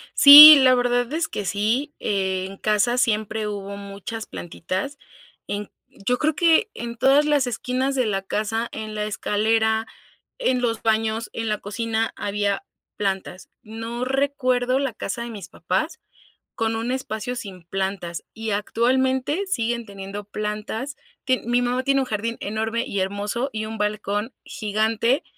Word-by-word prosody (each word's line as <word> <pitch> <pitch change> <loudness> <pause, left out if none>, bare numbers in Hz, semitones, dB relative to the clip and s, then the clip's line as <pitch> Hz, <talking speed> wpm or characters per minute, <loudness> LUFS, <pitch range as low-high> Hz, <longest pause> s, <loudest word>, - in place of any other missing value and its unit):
Sí, 295 +2 +12
la 255 -1 +5
verdad 245 0 0
es 320 0 0
que 205 - -5
sí. 220 +10 -1
Eh, 190 -2 -1
en 195 0 -10
casa 215 +4 +1
siempre 220 -2 0
hubo 200 -1 -6
muchas 200 +3 -7
plantitas 185 - -5 0.5
en 205 0 -5 0.3
yo 250 +3 +1
creo 310 0 +1
que 340 +7 +3
en 235 0 -6
todas 275 +4 +4
las 290 -4 +2
esquinas 255 +3 -2
de 255 -2 +1
la 195 -3 -1
casa, 215 +4 -2
en 215 0 -6
la 210 0 -2
escalera, 220 +1 0 0.5
en 260 - 0
los 230 -2 -1
baños, 220 0 0
en 225 -1 -3
la 210 - 0
cocina 225 +2 -2
había 205 -1 -2 0.3
plantas. 195 -2 -4
No 225 +3 -5
recuerdo 255 -2 +1
la 270 -3 -1
casa 220 +2 -4
de 235 - -7
mis 200 -5 -9
papás - - -2 0.6
con 225 -1 -1
un 230 +2 -2
espacio 250 -2 -4
sin 190 -6 -8
plantas, 190 -1 -4
y 225 0 -5
actualmente, 260 - 0
siguen 235 -8 -1
teniendo 200 0 -8
plantas. 215 +6 -5 0.3
Tie 260 -1 +1
mi 240 +1 +2
mamá 245 +1 0
tiene 275 0 +2
un - - -1
jardín 230 0 -3
enorme 225 +3 -2
y 200 - -3
hermoso, 205 +7 -2
y 215 0 -3
un 220 +1 -6
balcón 210 +2 -2
gigante 220 +4 0
225 Hz, 155 wpm, -23 LUFS, 205-250 Hz, 0.6 s, Sí